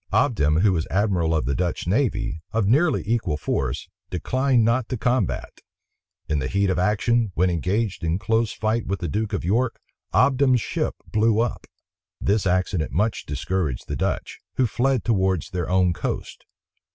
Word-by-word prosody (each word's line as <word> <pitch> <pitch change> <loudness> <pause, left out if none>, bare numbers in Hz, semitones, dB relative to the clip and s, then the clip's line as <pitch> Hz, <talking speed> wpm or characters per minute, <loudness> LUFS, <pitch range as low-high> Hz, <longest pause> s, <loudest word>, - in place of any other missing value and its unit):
Obdam, 85 - +2
who 100 -1 +4
was 80 -3 -1
admiral 95 -5 +1
of 75 - 0
the 70 - 0
Dutch 90 +2 -2
navy, 105 - 0
of 110 -2 +1
nearly 155 +9 +3
equal 110 -9 0
force, - - -2 0.2
declined 130 +6 +1
not 115 +1 +1
the 125 - -3
combat. 120 -3 -1 0.7
In 75 -2 0
the 65 - -2
heat 100 +4 +1
of 90 - 0
action, 105 +3 +2
when 90 +2 +2
engaged 95 +5 -1
in 85 +1 +1
close 110 +2 +1
fight 110 +1 -1
with 100 +1 -2
the 85 - -3
duke 105 +7 -2
of 100 -5 -2
York, 115 +6 +1 0.3
Obdam's 130 -1 +4
ship - - -2 0.2
blew 110 0 +3
up. 120 0 -1 0.5
This 100 0 +1
accident 90 -2 0
much 105 +5 -1
discouraged 75 -1 -2
the - - -3
Dutch, - - -2 0.2
who 130 - +3
fled 125 +2 +1
towards 95 -5 +1
their 90 -2 -3
own 90 -1 +3
coast. - - -5
100 Hz, 165 wpm, -24 LUFS, 90-115 Hz, 0.7 s, who